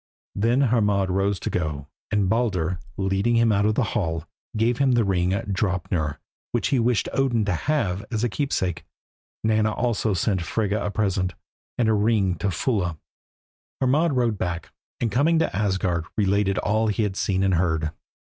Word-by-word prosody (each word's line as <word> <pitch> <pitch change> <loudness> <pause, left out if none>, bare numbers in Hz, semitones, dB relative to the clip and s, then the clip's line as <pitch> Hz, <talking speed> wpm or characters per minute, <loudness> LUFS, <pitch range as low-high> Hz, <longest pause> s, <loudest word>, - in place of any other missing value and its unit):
Then 115 +6 +2
Hermod 105 -7 +2
rose 95 +1 +1
to - - -3
go, 75 -5 -2 0.2
and 105 -2 +1
Baldur, 95 -6 0 0.2
leading 95 +4 +1
him 115 -1 +4
out 100 0 +2
of 110 - +1
the 130 - +2
hall, 80 -3 -1 0.3
gave 115 +2 +1
him 135 -2 +3
the 120 -1 +3
ring, 90 -3 +1
Draupnir, 95 -6 -1 0.4
which - - +1
he 135 - +2
wished 120 -1 +1
Odin 120 -5 +1
to 100 - 0
have 100 - -1
as 110 -1 -2
a - - +3
keepsake. 95 - -1 0.6
Nanna 110 0 +2
also 110 -3 0
sent 95 +1 0
Frigga 105 +4 -1
a - - -1
present, 95 -4 -1 0.4
and 120 - +2
a 110 - +4
ring 105 -3 +2
to 100 - 0
Fulla. 90 -5 -1 0.8
Hermod 145 +5 +2
rode 120 -5 +1
back, 90 -1 -3 0.3
and 115 -2 0
coming 150 +9 +3
to 160 - 0
Asgard 95 -4 0
related 100 -1 +2
all 110 +1 +1
he 105 +1 0
had 100 -2 -1
seen 95 -1 0
and 95 -1 +2
heard. 80 -3 +1
100 Hz, 170 wpm, -24 LUFS, 95-115 Hz, 0.8 s, him